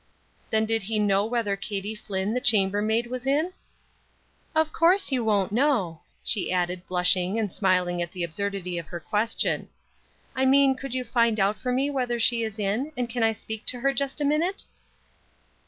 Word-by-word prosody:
Then 220 0 +2
did 225 0 +3
he 215 +3 -2
know 205 -1 +2
whether 225 -4 0
Katie 200 +1 -4
Flinn, 205 -1 -3
the 250 - -1
chamber 205 -5 +3
maid, 220 +2 +1
was 250 +1 -6
in? 310 +6 +1 1.0
"Of 315 0 +2
course 355 +1 +3
you 255 -3 +1
won't 205 -4 +1
know," 220 - +1 0.2
she 205 -5 0
added, 180 0 -1
blushing 180 +2 +2
and 210 -5 -1
smiling 180 -2 +1
at 170 0 -3
the 180 - -3
absurdity 180 0 -3
of 165 - -8
her 175 - -6
question. 210 +8 0 0.7
"I 265 0 +1
mean 275 0 +5
could 265 -1 -6
you 255 - -1
find 230 -2 +1
out 200 +2 +1
for 250 - -2
me 270 +3 +1
whether 250 -3 -1
she 230 +1 +2
is 220 -1 -3
in, 215 +8 -1
and 245 -1 -1
can 240 0 -2
I 225 0 +3
speak 220 0 -7
to 245 -1 -1
her 275 +1 +2
just 275 +2 -1
a 295 - 0
minute?" 325 +7 +1
220 Hz, 190 wpm, -26 LUFS, 195-255 Hz, 1.0 s, mean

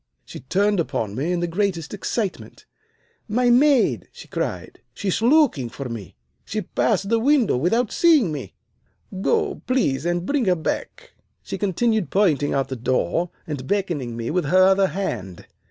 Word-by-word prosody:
She - - -9
turned 200 +7 +1
upon 110 -10 -2
me 140 +10 -2
in 175 -1 -1
the 175 - 0
greatest 175 -2 -2
excitement. 205 0 -4 0.6
'My 245 +3 +2
maid!' 270 +1 +3
she - - -13
cried. - - -4 0.2
'She 200 - -3
is 190 - 0
looking 240 - +3
for 135 +1 -7
me. 110 -7 -8 0.3
She - - -4
passed 195 - 0
the 230 0 +3
window 260 - +3
without 205 - +1
seeing 305 - +4
me. 145 -4 -6 0.7
Go, 420 - 0
please, 155 - +1
and 175 0 -1
bring 280 +1 0
her 185 -2 +3
back.' - - -5 0.3
She - - -6
continued 215 +1 0
pointing 160 -8 +2
out 135 - +2
of - - -4
the 130 - -3
door 130 - 0 0.2
and 140 -4 -5
beckoning 160 - -2
me 115 0 -3
with 180 +2 0
her 185 +1 +4
other 195 0 +4
hand. 95 - -5
185 Hz, 170 wpm, -22 LUFS, 145-230 Hz, 0.7 s, seeing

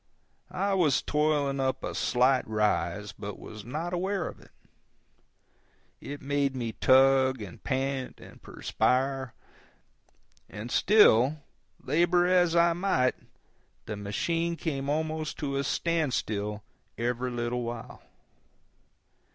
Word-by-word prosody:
I 195 +2 -1
was 165 -8 +3
toiling 150 -2 +1
up 130 0 -1
a - - -3
slight 130 +1 +2
rise, 105 -2 0
but 105 0 -8
was 110 -1 -10
not 155 - -4
aware 190 0 -1
of - - -9
it. - - -18 1.5
It 145 -1 -8
made 140 -1 0
me 120 -3 -3
tug 130 +1 +4
and 100 -5 -9
pant 135 -1 -2
and - - -14
perspire; 130 -1 -1 1.1
and 110 +4 -7
still, 150 - +5 0.4
labor 175 +5 +3
as 180 -2 +3
I 170 0 +5
might, 165 -8 +1 0.7
the 105 - -4
machine 165 +12 -1
came 140 -5 -3
almost 155 +1 -2
to 140 -2 -3
a 140 - 0
standstill 110 -11 -1 0.3
every 125 +2 -1
little 120 0 -2
while. 120 +1 -7
135 Hz, 115 wpm, -28 LUFS, 120-160 Hz, 1.5 s, still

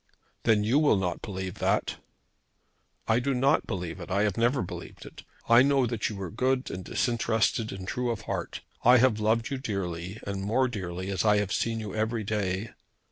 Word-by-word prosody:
"Then 110 -3 +4
you 120 +7 +3
will 145 -9 +4
not 90 -3 -2
believe 95 -3 -5
that." - - 0 1.1
"I 110 +1 +3
do 135 +2 0
not 135 +5 +2
believe 90 -4 -4
it. 85 - -8
I 100 +2 +2
have 105 -3 +1
never 120 +4 +2
believed 85 - -8
it. - - -11 0.3
I 115 +1 +7
know 135 -1 +3
that 115 -3 -1
you 105 -3 -6
are 90 - -5
good 130 +3 0
and 95 - -5
disinterested 115 -1 0
and 95 -1 -7
true 125 +3 -1
of 115 -3 -2
heart. - - -4 0.2
I 125 +2 +7
have 120 -3 +3
loved 110 +3 +1
you 135 - -2
dearly 95 -4 -4
and 100 -1 -3
more 115 +7 +2
dearly 95 -4 -4
as 95 - 0
I 105 -1 +4
have 105 -1 0
seen 115 -1 0
you 105 -3 -6
every 110 +1 -1
day. 100 0 -2
110 Hz, 195 wpm, -28 LUFS, 95-120 Hz, 1.1 s, I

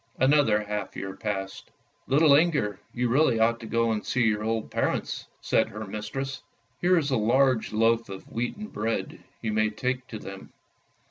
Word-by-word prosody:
Another 130 -6 +4
half 105 0 -4
year 95 0 -5
passed. 95 -2 -4 0.2
" - - -41
Little 145 +2 +5
Inger, 145 - +2
you 125 0 0
really 125 -2 +3
ought 115 +1 +3
to 115 - -8
go 115 +1 +1
and 110 -1 -1
see 125 - +1
your 105 -2 +1
old 110 0 -2
parents," - - -1
said - - +2
her 110 +1 -6
mistress. 135 +7 -5 0.2
" 115 +2 -41
Here 180 +1 +4
is 145 -4 0
a 130 - +3
large 120 +2 +2
loaf 115 +1 +2
of 95 -1 -7
wheaten 120 - -4
bread, 115 - -3 0.2
you 110 -2 -1
may 110 0 +2
take 125 +4 -3
to 115 - -6
them. 95 -2 -10
115 Hz, 185 wpm, -27 LUFS, 105-130 Hz, 0.2 s, Little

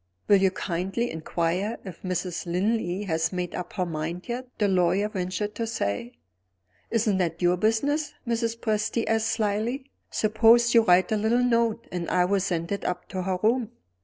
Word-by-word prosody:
"Will 205 - +7
you 190 0 +4
kindly 190 +6 -2
inquire 170 +6 -1
if 180 -4 -9
Mrs. 180 -1 -3
Linley 190 +1 0
has 165 -4 0
made 180 -1 -3
up 180 -1 -5
her 185 -3 -1
mind 165 +2 -4
yet?" 250 +1 -4
the 205 - +2
lawyer 185 +2 +2
ventured 205 +1 -3
to 230 - -3
say. 115 - -2 0.8
"Isn't 215 -4 +1
that 170 -2 -1
your 175 0 +4
business?" 280 - 0
Mrs. 230 -1 -1
Presty 215 +1 0
asked 225 0 +1
slyly. 225 +6 -1 0.2
"Suppose 230 +2 +4
you 230 - +7
write 180 -3 +4
a 215 - +2
little 225 +4 +2
note, 230 -2 +1
and 175 -1 -3
I 180 -1 +3
will 195 +2 +2
send 175 -2 -2
it 200 - -2
up 180 - -3
to 185 - -3
her 185 0 -1
room." 235 +1 +1
200 Hz, 175 wpm, -26 LUFS, 180-225 Hz, 0.8 s, Will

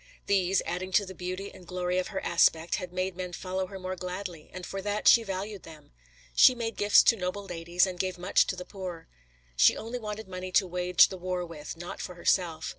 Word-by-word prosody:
These, 190 -1 +2
adding 185 +2 -4
to 200 - +4
the 190 - -8
beauty 185 +2 -5
and 180 - -14
glory 180 0 -1
of 185 - -2
her 195 - -4
aspect, 165 -1 +3
had 180 -3 -6
made 185 0 -2
men 180 -1 -5
follow 185 +2 -3
her 195 - -8
more 185 0 -4
gladly, 180 -2 -6
and 185 -1 -7
for 195 - -5
that 205 +1 -1
she 235 - +8
valued 195 -1 -5
them. 155 - -14 0.4
She 255 - +7
made 230 -2 -3
gifts 205 0 +6
to 230 - +5
noble 190 0 -4
ladies, 175 0 +1
and 185 -2 -6
gave 185 -1 -1
much 180 +2 +2
to - - -2
the 180 0 -7
poor. 180 -4 -7 0.5
She - - +5
only 230 +3 -5
wanted 215 -1 -6
money 185 0 -6
to 195 - +4
wage 180 0 +4
the 190 - -7
war 180 0 -2
with, 165 -2 -8
not 175 +1 -7
for 180 - -6
herself. 170 -2 0
185 Hz, 220 wpm, -28 LUFS, 175-195 Hz, 0.5 s, she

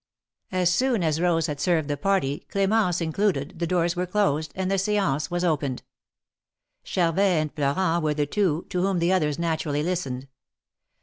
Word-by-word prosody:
As 180 -1 +2
soon 250 -3 +1
as 160 -1 +1
Bose 170 -2 +2
had 150 -3 -4
served 165 -4 +1
the 145 - -1
party, 145 -4 -1
Cl^mence 195 -3 +1
included, 165 -2 -1
the 170 - -1
doors 175 0 +1
were 180 +1 -2
closed, 160 -6 0
and 190 0 -2
the 195 - +2
stance 195 -8 0
was 175 0 -2
opened. 145 -6 -1 1.0
Charvet 170 -1 0
and 165 -7 +2
Florent 165 +3 0
were 150 -1 +1
the 145 -1 +1
two, 175 0 0
to 180 - 0
whom 190 0 +1
the 170 +2 +2
others 150 -5 +1
naturally 160 -3 -1
listened. 140 -7 -3
170 Hz, 170 wpm, -25 LUFS, 150-185 Hz, 1.0 s, As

